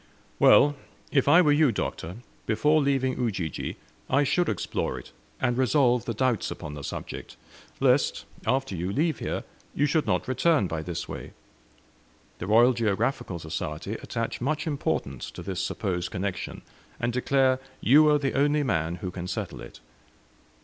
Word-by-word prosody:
"Well, 145 Hz, 0 st, +6 dB, 0.4 s
if 135 Hz, -2 st, +2 dB
I 165 Hz, +5 st, +7 dB
were 150 Hz, -, +4 dB
you, 145 Hz, -2 st, +4 dB
Doctor, 90 Hz, -4 st, -4 dB, 0.3 s
before 150 Hz, +8 st, +3 dB
leaving 135 Hz, -2 st, +1 dB
Ujiji, 95 Hz, -, -2 dB, 0.3 s
I 140 Hz, +2 st, +4 dB
should 175 Hz, +5 st, +1 dB
explore 100 Hz, -, -2 dB
it, -, -, -10 dB, 0.3 s
and 120 Hz, -2 st, +1 dB
resolve 125 Hz, -2 st, +3 dB
the 115 Hz, -, -3 dB
doubts 125 Hz, -2 st, +1 dB
upon 75 Hz, -, -6 dB
the 75 Hz, -1 st, -7 dB
subject; -, -, -7 dB, 0.4 s
lest, -, -, +2 dB, 0.2 s
after 135 Hz, -6 st, 0 dB
you 90 Hz, +3 st, -2 dB
leave 155 Hz, +7 st, 0 dB
here, -, -, -3 dB, 0.3 s
you 145 Hz, -, +3 dB
should 150 Hz, +1 st, +1 dB
not -, -, 0 dB
return 145 Hz, -, +2 dB
by 80 Hz, -3 st, -3 dB
this 85 Hz, +1 st, -5 dB
way. -, -, -8 dB, 1.1 s
The 90 Hz, -, -5 dB
Royal 120 Hz, +4 st, +6 dB
Geographical 115 Hz, -1 st, -1 dB
Society 80 Hz, +3 st, -4 dB
attach 115 Hz, 0 st, -4 dB
much 150 Hz, +4 st, -1 dB
importance 140 Hz, -, -2 dB
to 90 Hz, -, -9 dB
this 95 Hz, 0 st, -3 dB
supposed 90 Hz, -4 st, -2 dB
connection, 100 Hz, -1 st, -4 dB, 0.4 s
and 120 Hz, 0 st, -1 dB
declare 130 Hz, +1 st, +2 dB, 0.2 s
you 150 Hz, +5 st, +6 dB
are 150 Hz, -, +5 dB
the 140 Hz, -2 st, -1 dB
only 145 Hz, +2 st, +2 dB
man 85 Hz, -, 0 dB
who 90 Hz, -, -3 dB
can 90 Hz, 0 st, -6 dB
settle 95 Hz, -, -4 dB
it. -, -, -11 dB
120 Hz, 155 wpm, -27 LUFS, 95-140 Hz, 1.1 s, I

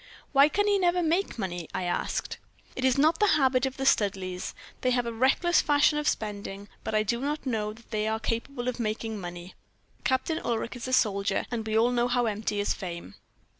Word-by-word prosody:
"'Why 280 Hz, +1 st, +6 dB
can 410 Hz, +6 st, +1 dB
he 405 Hz, -1 st, +3 dB
never 355 Hz, -1 st, +2 dB
make 335 Hz, +2 st, 0 dB
money?' 175 Hz, -5 st, -4 dB
I 185 Hz, -, -1 dB
asked. 175 Hz, -, -2 dB, 0.4 s
"'It 260 Hz, -, -4 dB
is 260 Hz, -1 st, +3 dB
not 315 Hz, +3 st, +4 dB
the 420 Hz, -, +4 dB
habit 265 Hz, -2 st, +3 dB
of 265 Hz, -, -7 dB
the 270 Hz, -, -2 dB
Studleighs: 190 Hz, -6 st, 0 dB, 0.3 s
they 255 Hz, -, +2 dB
have 245 Hz, -1 st, +1 dB
a 235 Hz, -, -3 dB
reckless 270 Hz, +9 st, +3 dB
fashion 295 Hz, +1 st, +3 dB
of 300 Hz, -, -2 dB
spending, 205 Hz, -1 st, -3 dB, 0.2 s
but 220 Hz, -, -2 dB
I 215 Hz, -, +3 dB
do 235 Hz, +3 st, -1 dB
not 295 Hz, +2 st, -2 dB
know 215 Hz, -4 st, -1 dB
that 230 Hz, +2 st, -16 dB
they 215 Hz, 0 st, 0 dB
are 220 Hz, 0 st, 0 dB
capable 240 Hz, +3 st, -3 dB
of 250 Hz, -1 st, -2 dB
making 220 Hz, -1 st, -2 dB
money. 175 Hz, 0 st, -8 dB, 0.5 s
Captain 265 Hz, +5 st, 0 dB
Ulric 230 Hz, +1 st, -2 dB
is 245 Hz, 0 st, -6 dB
a -, -, -3 dB
soldier, 200 Hz, -4 st, +2 dB
and 225 Hz, -2 st, -3 dB
we 220 Hz, 0 st, +1 dB
all 235 Hz, +2 st, +4 dB
know 240 Hz, 0 st, +2 dB
how 245 Hz, 0 st, +1 dB
empty 210 Hz, -1 st, -2 dB
is 205 Hz, -, +1 dB
fame.' 170 Hz, -, -7 dB
235 Hz, 210 wpm, -28 LUFS, 210-270 Hz, 0.5 s, Why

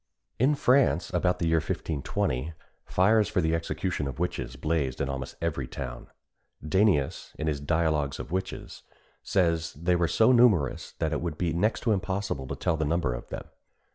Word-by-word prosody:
In 135 Hz, +5 st, +4 dB
France, 130 Hz, -, +3 dB
about 90 Hz, +1 st, +2 dB
the 85 Hz, -, -1 dB
year 80 Hz, 0 st, +3 dB
1520, 70 Hz, -1 st, -2 dB, 0.3 s
fires 105 Hz, +3 st, +3 dB
for -, -, 0 dB
the 80 Hz, -2 st, +1 dB
execution 85 Hz, -1 st, -2 dB
of 65 Hz, -, -6 dB
witches 90 Hz, +1 st, -3 dB
blazed 75 Hz, -5 st, -1 dB
in 70 Hz, -, -1 dB
almost 65 Hz, -1 st, -5 dB
every 70 Hz, -6 st, -1 dB
town. 60 Hz, -3 st, -7 dB, 0.6 s
Danæus, 95 Hz, -4 st, +1 dB
in 75 Hz, -, -4 dB
his 75 Hz, -2 st, 0 dB
Dialogues 75 Hz, -2 st, 0 dB
of -, -, -7 dB
Witches, 95 Hz, +1 st, -4 dB, 0.4 s
says 85 Hz, -3 st, +1 dB
they 85 Hz, +4 st, +1 dB
were 85 Hz, -1 st, +2 dB
so 110 Hz, +8 st, +4 dB
numerous 105 Hz, -, +3 dB
that 80 Hz, -1 st, -2 dB
it 80 Hz, -, -1 dB
would 85 Hz, -3 st, -3 dB
be 85 Hz, -2 st, 0 dB
next 105 Hz, +6 st, +1 dB
to 115 Hz, -, +1 dB
impossible 95 Hz, -8 st, -2 dB
to -, -, -4 dB
tell 80 Hz, -, 0 dB
the 80 Hz, -, 0 dB
number 75 Hz, -4 st, 0 dB
of -, -, -8 dB
them. -, -, -6 dB
85 Hz, 175 wpm, -28 LUFS, 75-95 Hz, 0.6 s, In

